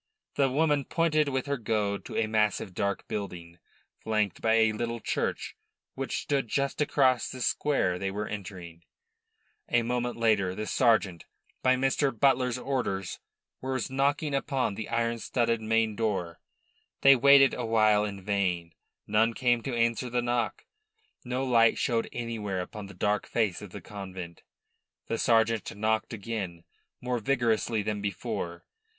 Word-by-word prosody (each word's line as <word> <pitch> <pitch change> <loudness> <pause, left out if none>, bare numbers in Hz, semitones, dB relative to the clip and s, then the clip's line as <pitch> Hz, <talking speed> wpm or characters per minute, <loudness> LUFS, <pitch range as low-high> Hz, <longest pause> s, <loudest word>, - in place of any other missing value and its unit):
The 140 -2 +2
woman 145 0 +2
pointed 155 -3 +1
with 130 -1 -1
her 140 0 -1
goad 105 -2 -1
to - - -6
a 115 - +2
massive, 105 -3 0
dark 100 +2 -2
building, 85 -4 -6 0.4
flanked 105 -4 -1
by 110 0 +3
a 110 -1 +4
little 115 +2 -3
church, - - -2 0.4
which 135 -2 -3
stood 140 -4 0
just 140 +5 -1
across 130 -4 +2
the 130 - -7
square 120 -8 +1
they 95 - -1
were 105 +2 -3
entering. 90 -5 -8 0.9
A 120 -1 +3
moment 120 +1 -2
later 105 -5 +2
the 110 - -4
sergeant, 110 -9 +2 0.4
by 130 0 +4
Mr. 135 -1 0
Butler's 130 -2 +3
orders, 125 -8 -2 0.4
was 130 -1 -2
knocking 140 +2 +1
upon 135 -4 0
the 110 +2 -6
iron 115 0 0
studded 115 0 0
main 110 -1 +1
door. 95 -7 -2 0.6
They 140 0 +8
waited 135 +1 +6
awhile 110 -2 +3
in 100 -2 -5
vain. 90 -4 -1 0.3
None 110 +2 +2
came 120 -2 +2
to 125 +1 -3
answer 115 +2 +1
the 120 0 0
knock; 120 -4 -1 0.6
no 125 +1 -2
light 115 -3 +4
showed 115 -3 0
anywhere 110 -5 -3
upon 100 +3 -7
the 100 - -12
dark 105 +2 0
face 105 -6 0
of 105 - -8
the 100 +2 -9
convent. 95 -3 -8 0.6
The 115 - -3
sergeant 115 -3 +2
knocked 110 +1 0
again, 100 -6 -5 0.4
more 125 -1 -1
vigorously 115 -3 +1
than 105 0 -2
before. 90 -3 -4
115 Hz, 150 wpm, -28 LUFS, 100-125 Hz, 0.9 s, They